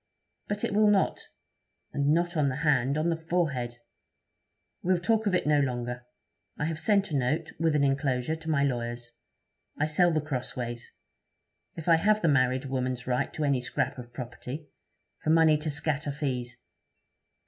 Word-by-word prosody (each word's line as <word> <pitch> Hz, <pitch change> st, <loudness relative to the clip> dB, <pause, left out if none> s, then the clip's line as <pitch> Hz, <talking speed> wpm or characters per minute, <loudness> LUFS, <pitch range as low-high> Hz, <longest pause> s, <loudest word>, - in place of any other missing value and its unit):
But 205 Hz, 0 st, -3 dB
it -, -, 0 dB
will 210 Hz, +1 st, +5 dB
not. 200 Hz, -2 st, +2 dB, 0.7 s
And 140 Hz, 0 st, 0 dB
not 175 Hz, +2 st, +1 dB
on 150 Hz, -3 st, +2 dB
the 130 Hz, -, -2 dB
hand 140 Hz, -1 st, +3 dB
on 155 Hz, +2 st, +1 dB
the -, -, +1 dB
forehead! 150 Hz, -8 st, -1 dB, 1.0 s
We'll 185 Hz, +1 st, +2 dB
talk 220 Hz, +4 st, +1 dB
of 190 Hz, -, +2 dB
it -, -, +1 dB
no 150 Hz, -1 st, +4 dB
longer. 125 Hz, -2 st, -2 dB, 0.5 s
I 150 Hz, -, -1 dB
have 160 Hz, 0 st, -2 dB
sent 200 Hz, 0 st, +2 dB
a -, -, -1 dB
note, 135 Hz, +3 st, 0 dB
with 160 Hz, -2 st, +2 dB
an 145 Hz, -, +3 dB
enclosure, 135 Hz, +1 st, +1 dB
to 160 Hz, 0 st, -8 dB
my 145 Hz, -3 st, +2 dB
lawyers. 120 Hz, -2 st, -2 dB, 0.7 s
I 150 Hz, -, +2 dB
sell 170 Hz, +3 st, +3 dB
The 155 Hz, -, +2 dB
Crossways, 125 Hz, -4 st, -4 dB, 0.8 s
if 165 Hz, -1 st, -8 dB
I 165 Hz, -1 st, +6 dB
have 210 Hz, +4 st, +2 dB
the -, -, +4 dB
married 130 Hz, -2 st, +2 dB
woman's 130 Hz, -2 st, -2 dB
right 125 Hz, +2 st, 0 dB
to 155 Hz, -, -2 dB
any 140 Hz, -3 st, +2 dB
scrap 125 Hz, +1 st, -2 dB
of 120 Hz, -1 st, -10 dB
property, 125 Hz, +4 st, -7 dB, 0.5 s
for -, -, -1 dB
money 160 Hz, -1 st, +6 dB
to 155 Hz, +1 st, -3 dB
scatter 145 Hz, 0 st, -1 dB
fees.' 125 Hz, -4 st, -3 dB
145 Hz, 170 wpm, -28 LUFS, 125-165 Hz, 1.0 s, I